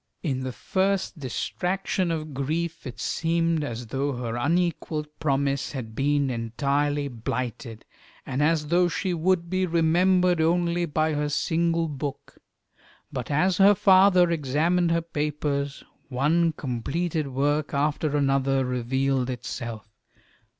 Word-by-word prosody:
In 135 -6 -1
the 130 0 -3
first 190 +5 -1
distraction 180 - -2
of 155 -2 -3
grief 155 +4 -3
it 125 - -8
seemed 165 -1 0
as 120 -3 -5
though 135 +5 -2
her 120 -2 -4
unequalled 160 +2 0
promise 140 -2 0
had 120 -5 -6
been 140 +2 +1
entirely 140 +5 -1
blighted, 120 -2 -5 0.4
and 135 +2 -2
as 150 -1 +1
though 175 +1 +4
she 180 +2 -2
would 170 +1 +1
be 185 +1 0
remembered 175 +1 +3
only 170 +1 +1
by 155 +1 0
her 150 0 -1
single 165 +2 +1
book. 145 -2 -6 0.7
But 125 -3 -4
as 175 +5 +2
her 200 +1 +6
father 185 -2 +5
examined 165 +4 +1
her 170 0 +2
papers, 145 -3 -2 0.3
one 160 +6 +2
completed 150 +5 -2
work 145 +3 0
after 150 +1 0
another 135 -1 +2
revealed 130 +1 0
itself. 120 -3 -5
150 Hz, 125 wpm, -25 LUFS, 135-170 Hz, 0.7 s, her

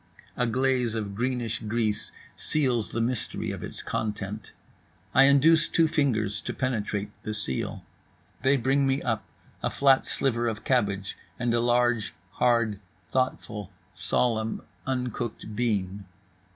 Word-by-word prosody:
A 125 - +1
glaze 125 -1 +1
of 105 -3 -3
greenish 120 0 -1
grease 110 -1 -1 0.2
seals 125 -7 +1
the 115 - -1
mystery 120 0 -1
of - - -6
its - - -2
content, 105 -1 -4 0.6
I 135 - +7
induce 155 +4 +5
two 165 -1 +3
fingers 110 -9 0
to - - -5
penetrate 105 -5 -2
the 110 - -4
seal. 65 -11 0 0.6
They 135 +2 +4
bring 135 +2 +2
me 135 +1 +1
up 110 -4 -1 0.4
a - - 0
flat 135 -1 +4
sliver 120 -3 +1
of 110 -2 -3
cabbage 100 -6 0 0.2
and 120 -1 0
a 120 - +3
large, 120 -1 +2 0.2
hard, 115 -4 +2 0.3
thoughtful, 110 -6 -2 0.2
solemn, 110 -2 0 0.2
uncooked 120 -4 -3
bean. 100 -4 -1
120 Hz, 130 wpm, -27 LUFS, 105-130 Hz, 0.6 s, I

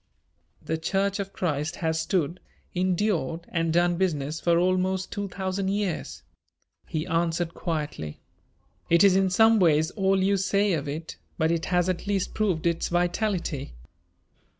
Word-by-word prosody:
"The 160 0 -2
Church 195 +4 0
of 195 0 -4
Christ 155 -4 -2
has 160 -1 -1
stood, 170 0 -1 0.3
endured 180 -3 0
and 165 -1 0
done 175 +1 +2
business 155 -4 -1
for 170 -1 +3
almost 185 +1 +1
two 205 0 -3
thousand 190 0 -3
years," 200 -3 -2 0.6
he 155 0 -2
answered 170 0 0
quietly. 150 - -4 0.7
"It 170 +2 +5
is 195 -2 +6
in 190 0 +3
some 220 +4 +5
ways 160 -2 +3
all 195 -2 +1
you 200 +1 +3
say 200 +1 +2
of 150 -3 -2
it, 155 +3 -5 0.2
but 160 0 +2
it 165 -1 -1
has 180 -1 +1
at 185 +1 -2
least 200 -2 -1
proved 190 -7 0
its 170 -1 +1
vitality. 175 - -1
175 Hz, 150 wpm, -26 LUFS, 160-190 Hz, 0.7 s, is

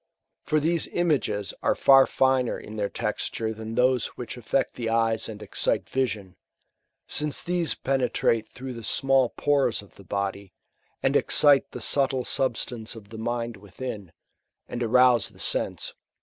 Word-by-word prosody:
For 155 - +1
these 165 +3 +1
images 140 - 0
are - - +2
far 135 -1 +6
finer 130 -2 +1
in 105 - -10
their 100 -2 -1
texture 110 +1 -3
than 110 +1 -7
those 125 -2 +3
which 125 - -6
aflect 125 +2 -1
the 115 -2 -3
eyes 115 -1 +1
and 105 -1 -8
excite 100 - 0
vision; 105 -8 -2 0.7
since 150 -1 0
these 175 -3 0
penetrate 125 -4 0
through 130 0 -8
the 115 - -8
small 135 +2 +2
pores 135 -7 +1
of 100 - -20
the 100 - -13
body, 100 0 -4 0.5
and - - +2
excite 145 -2 +4
the - - -8
subtle 135 -2 +2
substance 120 -3 -1
of 105 -3 -12
the 110 0 -9
mind 120 0 -3
within, 100 -1 -7 0.6
and 120 - -5
arouse 125 0 +4
the - - -19
sense. - - -1
120 Hz, 150 wpm, -26 LUFS, 110-135 Hz, 0.7 s, far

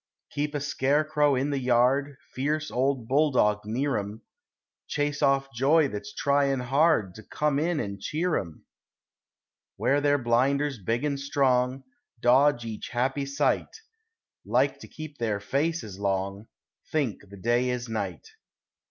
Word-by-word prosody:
Keep 145 +1 -2
a - - 0
scarecrow 145 +1 +1
in 135 +3 0
the 140 - 0
yard, 130 +3 +2 0.2
Fierce 150 +3 -1
old 130 -2 0
bulldog 130 -7 +3
near 130 +6 0
'em; 105 +3 -7 0.6
Chase 145 -1 -1
off 135 -1 +2
joy 140 +4 +3
that's 105 -3 -6
tryin' 140 -1 +1
hard 135 - +2
To 110 - -11
come 150 -2 0
in 165 0 0
an' 100 -4 -4
cheer 165 - -1
'em. 85 -4 -5 1.1
Wear 145 +1 +2
their 145 0 +3
blinders 135 +1 +1
big 115 +7 -1
and 140 -2 -1
strong, 130 -2 +1 0.4
Dodge 125 +1 +4
each 110 -2 -6
happy 135 +3 -1
sight; 140 - 0 0.7
Like - - +1
to - - -11
keep 155 -2 -10
their 110 -3 -1
faces 135 - -2
long; 100 +1 -2 0.4
Think 125 -10 -2
the 100 - -11
day 120 +5 +1
is 125 0 -3
night. 100 - -4
135 Hz, 140 wpm, -27 LUFS, 115-145 Hz, 1.1 s, Dodge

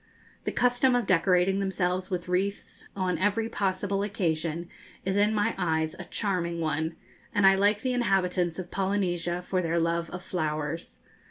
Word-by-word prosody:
The - - 0
custom 250 +1 +3
of 245 - +1
decorating 185 +2 +3
themselves 185 -1 -1
with 180 -2 -3
wreaths 195 +3 -2
on 185 -4 -1
every 210 +4 +1
possible 195 0 -1
occasion 170 -4 -1 0.4
is 190 0 0
in 205 +1 +4
my 215 +1 +1
eyes 160 -3 0
a 185 - -6
charming 175 -5 -1
one, 160 0 -1 0.4
and 205 -2 +4
I 195 - +8
like 205 +2 +3
the 255 -1 0
inhabitants 180 -7 +1
of 180 -2 -6
Polynesia 180 -3 -1
for 185 0 0
their 170 -1 0
love 170 0 0
of 180 0 -7
flowers. 155 -3 -3
185 Hz, 160 wpm, -28 LUFS, 170-200 Hz, 0.4 s, I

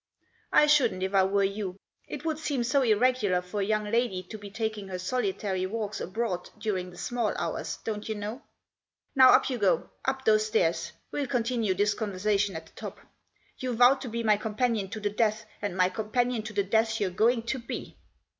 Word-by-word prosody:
"I - - +6
shouldn't 260 -11 +3
if 190 +1 -2
I 195 -1 +5
were 200 +1 +2
you. 195 -1 -2 0.3
It - - -7
would 315 -1 -1
seem 285 -5 -1
so 260 +4 +2
irregular 220 -4 +3
for 180 +3 -4
a - - +2
young 215 +1 +1
lady 210 -3 0
to 220 - -5
be 205 0 -9
taking 215 -1 -3
her 185 -1 -4
solitary 190 -2 -1
walks 215 0 -4
abroad 185 -2 -3
during 200 -4 -2
the 180 - -14
small 240 0 -1
hours, - - -3
don't 215 -1 -4
you 220 - -1
know. 210 +6 -5 0.7
Now 260 -1 +8
up - - +6
you 255 -3 -2
go 185 -5 +1
— - - -24
up 265 0 -1
those 215 -1 +4
stairs. 170 -6 +1 0.2
We'll 285 -2 -2
continue 235 -5 0
this 205 +2 +2
conversation 205 -2 0
at 160 0 -6
the - - -19
top. - - -8 0.6
You 255 -2 -2
vowed 250 +3 +6
to 265 - -5
be 230 +1 -3
my 215 -2 +4
companion 215 -1 -1
to 220 - -5
the 205 -1 -1
death, 215 0 0 0.2
and 200 -3 -3
my 185 0 +4
companion 225 +4 -1
to 215 - -6
the 200 0 +1
death 220 +2 +1
you're 195 -3 0
going 230 +5 +2
to 250 +3 -2
be." 235 - -6
215 Hz, 205 wpm, -28 LUFS, 195-235 Hz, 0.7 s, Now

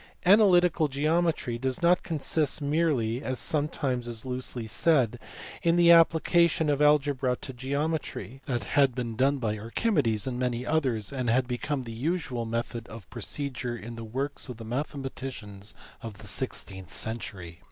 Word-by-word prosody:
Analytical 180 -5 +5
geometry 155 -3 0
does 130 +5 -2
not 175 +1 +5
consist 155 -2 -1
merely 140 -6 +1
(as 130 - -2
is 125 - -4
some 145 +5 +1
times 125 -5 -3
loosely 125 -2 -4
said) 120 0 +2 0.4
in 170 0 +3
the 170 -1 +6
application 165 -1 +4
of 145 0 0
algebra 145 -3 +3
to 130 - -8
geometry: 140 0 -3
that 120 -3 -1
had 135 -4 +3
been 120 -3 -3
done 135 +4 +2
by 110 -4 -2
Archimedes 115 - 0
and 125 -2 -3
many 125 -1 -1
others, 130 -8 0
and 130 -3 -1
had 125 +2 +2
become 130 +2 -2
the 115 - -7
usual 130 -3 -2
method 115 0 -3
of 110 -4 -10
procedure 125 +1 -3
in 115 +1 -8
the 115 - -7
works 135 +6 -3
of 125 - -6
the 115 - -9
mathematicians 125 -5 -5 0.3
of 115 -3 -7
the 105 - -11
sixteenth 95 -5 -3
century. 95 -7 -4
130 Hz, 155 wpm, -28 LUFS, 115-150 Hz, 0.4 s, the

